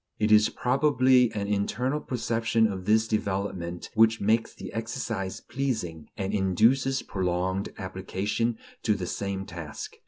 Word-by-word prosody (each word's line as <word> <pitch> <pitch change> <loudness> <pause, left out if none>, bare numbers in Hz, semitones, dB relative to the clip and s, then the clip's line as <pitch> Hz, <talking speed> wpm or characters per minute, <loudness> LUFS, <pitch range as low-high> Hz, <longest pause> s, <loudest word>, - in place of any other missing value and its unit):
It 105 0 +1
is 105 0 +6
probably 130 -1 +3
the 105 -2 -4
internal 125 +8 0
perception 115 -3 0
of 95 -4 -2
this 110 +2 +3
development 95 -5 -2
which 115 0 +4
makes 110 +3 +2
the - - -8
exercise 115 -4 -3
pleasing, 110 - -3
and 100 0 -2
induces 115 +8 +2
prolonged 95 +1 -1
application 95 +5 -2 0.2
to 105 - +2
the 95 - -4
same 95 +1 -3
task. 80 -4 -7
105 Hz, 130 wpm, -27 LUFS, 95-115 Hz, 0.2 s, is